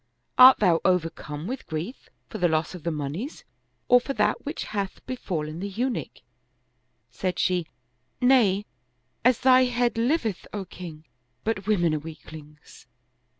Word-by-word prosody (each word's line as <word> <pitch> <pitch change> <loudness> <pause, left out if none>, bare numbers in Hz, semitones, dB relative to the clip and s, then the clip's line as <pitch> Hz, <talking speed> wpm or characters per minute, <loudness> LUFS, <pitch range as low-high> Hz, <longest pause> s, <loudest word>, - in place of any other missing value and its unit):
Art 255 +1 +10
thou 175 -5 +3
overcome 165 -4 -1
with 255 +7 -5
grief 165 - -6 0.2
for - - -7
the 175 - +3
loss 160 +1 0
of 180 - -8
the 170 - -2
moneys 155 - -5 0.4
or 245 0 +6
for 275 - -4
that - - +1
which 295 +3 -4
hath 200 -2 -4
befallen 165 -10 -4
the 200 +2 -4
Eunuch? 240 +6 -3 0.5
" - - -46 0.3
Said 185 -1 -3
she, 180 -3 +1 0.3
" 125 +1 -47
Nay, 235 -6 +4 0.6
as 250 0 +3
thy 255 0 +6
head 245 -1 0
liveth, 235 - 0
O 200 -2 -4
king! 165 -4 -10 0.4
but 210 -3 -2
women 175 -7 +2
are 155 - 0
weaklings." 150 -2 -12
190 Hz, 150 wpm, -26 LUFS, 160-245 Hz, 0.6 s, Art